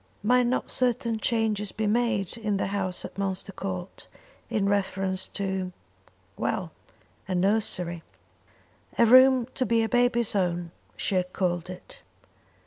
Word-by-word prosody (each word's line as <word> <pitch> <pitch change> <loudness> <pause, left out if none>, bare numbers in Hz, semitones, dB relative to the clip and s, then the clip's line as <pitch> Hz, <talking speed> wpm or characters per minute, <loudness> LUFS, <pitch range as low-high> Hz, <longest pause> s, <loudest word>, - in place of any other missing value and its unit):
Might 245 +2 +4
not 255 - -1
certain 235 -3 0
changes 215 -3 0
be 220 - -2
made 215 -3 +1
in 210 -3 -1
the - - 0
house 190 -2 -2
at - - -9
Munster 195 0 -2
Court 185 -1 -6 0.4
in 200 -2 0
reference 190 -1 0
to 190 -2 -3 0.6
well, 160 - -2 0.6
to 190 - -2
a - - 0
nursery. 180 -3 +1 1.0
A 235 - +6
room 255 +1 +7
to 260 - 0
be 230 -1 +2
baby's 240 -2 +2
own 175 -3 0 0.3
she - - 0
had 180 -1 0
called 175 -2 -1
it. 340 - -10
200 Hz, 135 wpm, -27 LUFS, 185-230 Hz, 1.0 s, room